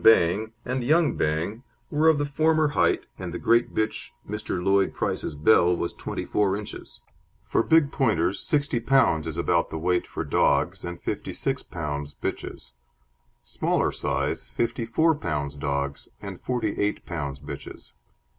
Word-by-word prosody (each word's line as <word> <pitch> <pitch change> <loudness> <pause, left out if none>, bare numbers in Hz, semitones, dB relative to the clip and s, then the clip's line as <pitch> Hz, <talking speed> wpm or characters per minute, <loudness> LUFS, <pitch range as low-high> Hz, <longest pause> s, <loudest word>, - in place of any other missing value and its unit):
Bang 110 +1 +5
and 125 0 -1
Young 155 +1 +3
Bang 80 +9 -1 0.3
were 155 +2 +3
of 160 - +4
the 145 - 0
former 155 +2 +2
height, 145 - +2
and 90 -2 -5
the 85 - -4
great 120 +5 +2
bitch, 110 0 -1 0.2
Mr. 105 -3 -3
Lloyd 95 +1 +2
Price's - - -2
Belle, 85 +2 +4
was 85 - -2
24 100 -2 -1
inches. 105 - -8 0.4
For - - +1
big 160 +2 +4
Pointers 100 - +1
60 145 -4 +1
pounds 115 -10 +3
is 80 0 -4
about 85 0 +1
the 80 - -4
weight 90 +2 0
for - - -4
dogs - - +2
and 85 0 -5
56 - - -2
pounds 75 -1 -5
bitches; - - -5 0.7
smaller - - 0
size, - - -2
54 120 +8 +1
pounds 75 - -2
dogs 70 -1 -3
and 100 -3 -8
48 110 -4 -1
pounds 70 -5 -4
bitches. 70 - -9
100 Hz, 145 wpm, -26 LUFS, 80-125 Hz, 0.7 s, Bang